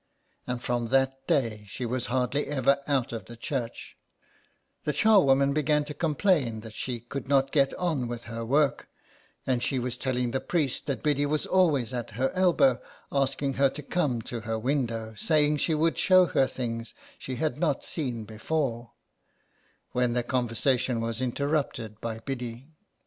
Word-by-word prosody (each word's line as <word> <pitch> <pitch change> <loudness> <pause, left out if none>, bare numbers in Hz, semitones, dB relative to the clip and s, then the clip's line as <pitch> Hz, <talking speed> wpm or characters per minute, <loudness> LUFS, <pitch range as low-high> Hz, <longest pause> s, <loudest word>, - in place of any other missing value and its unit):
And 125 -1 -3
from 120 -1 -1
that 135 +1 +1
day 110 -6 0
she 120 +5 -5
was 125 +1 -2
hardly 130 +3 0
ever 140 -1 +2
out 135 -5 0
of 115 - -5
the 120 - -11
church; 120 -1 -4 0.9
the 150 - 0
charwoman 140 -8 +5
began 150 0 +2
to 150 - -6
complain 150 - +1
that 110 -1 -10
she 120 +1 -4
could 135 +4 -6
not 135 -1 +3
get 140 -2 +3
on 155 -9 -1
with 120 0 -5
her 115 0 -5
work, 140 +4 +1 0.6
and 125 -2 +1
she 135 - 0
was 125 0 -2
telling 125 -2 -1
the 135 - 0
priest 150 -7 -1
that 140 - -2
Biddy 145 -1 +2
was 150 +1 0
always 150 -10 +2
at 120 -2 -3
her 130 +2 +1
elbow, 175 -9 +3 0.3
asking 140 0 0
her 135 +1 +3
to 150 - -8
come 140 -8 0
to 120 - -5
her 110 0 -3
window, 115 -3 -1
saying 150 +3 +3
she 160 +2 +1
would 160 +2 +1
show 185 -1 +6
her 135 -5 +2
things 115 -3 -5 0.2
she 130 - -5
had 155 +3 -1
not 150 -5 0
seen 125 -8 -3
before, 120 +1 -2 1.0
when 125 -1 +1
their 120 0 0
conversation 125 0 0
was 115 +1 -3
interrupted 130 -4 -2
by 115 -1 -3
Biddy. 125 +2 -6
130 Hz, 165 wpm, -28 LUFS, 120-145 Hz, 1.0 s, show